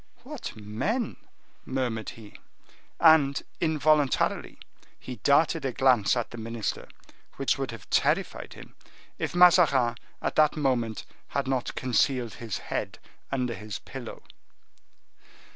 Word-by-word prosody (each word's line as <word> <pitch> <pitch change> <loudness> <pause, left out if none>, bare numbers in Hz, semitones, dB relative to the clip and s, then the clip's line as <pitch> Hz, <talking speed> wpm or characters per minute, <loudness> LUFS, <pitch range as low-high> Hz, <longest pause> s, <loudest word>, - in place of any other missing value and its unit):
"What 290 +1 -7
men!" 115 - -2 0.5
murmured 125 -5 -2
he. 110 -2 -13 0.7
And, 155 -4 +5 0.2
involuntarily, 155 -3 +1 0.4
he 125 -1 -8
darted 145 +7 +3
a 135 - -1
glance 125 -3 +3
at 120 - -3
the 120 - -8
minister 115 -1 -4 0.5
which 135 0 0
would 135 -2 -2
have 115 -4 -9
terrified - - 0
him, - - -13 0.5
if - - -3
Mazarin, 165 -9 +5 0.2
at - - -3
the 155 -1 +6
moment, 120 -6 0 0.2
had 140 -1 -2
not 130 -2 -1
concealed 125 -2 +1
his 115 -4 -3 0.2
head - - -3 0.3
under 125 -3 -1
his 105 -2 -6
pillow. - - -9
130 Hz, 120 wpm, -27 LUFS, 115-150 Hz, 0.7 s, the